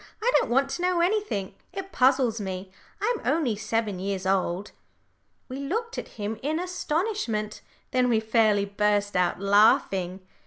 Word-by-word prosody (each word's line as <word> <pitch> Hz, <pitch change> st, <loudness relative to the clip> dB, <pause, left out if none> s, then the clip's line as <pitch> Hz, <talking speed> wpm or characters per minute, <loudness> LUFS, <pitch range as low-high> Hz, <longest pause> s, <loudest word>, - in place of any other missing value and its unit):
"I 470 Hz, +3 st, +2 dB
don't -, -, -2 dB
want 270 Hz, +3 st, +2 dB
to 350 Hz, -, -3 dB
know 360 Hz, -1 st, +2 dB
anything. 360 Hz, -, 0 dB, 0.2 s
It 390 Hz, 0 st, -6 dB
puzzles 255 Hz, -4 st, +3 dB
me. 190 Hz, -1 st, -5 dB, 0.3 s
I'm 455 Hz, +2 st, 0 dB
only 275 Hz, -4 st, +1 dB
seven 215 Hz, -2 st, -2 dB
years 190 Hz, 0 st, -3 dB
old." 190 Hz, 0 st, 0 dB, 0.8 s
We 260 Hz, -, -6 dB
looked 455 Hz, -, -3 dB
at -, -, -7 dB
him 210 Hz, +1 st, -4 dB
in 310 Hz, +4 st, -1 dB
astonishment. 345 Hz, -, -2 dB, 0.3 s
Then 250 Hz, -1 st, +2 dB
we 225 Hz, -2 st, +3 dB
fairly 220 Hz, -2 st, +2 dB
burst 205 Hz, 0 st, 0 dB
out 180 Hz, -1 st, +1 dB
laughing. 195 Hz, -2 st, +3 dB
225 Hz, 150 wpm, -26 LUFS, 200-320 Hz, 0.8 s, puzzles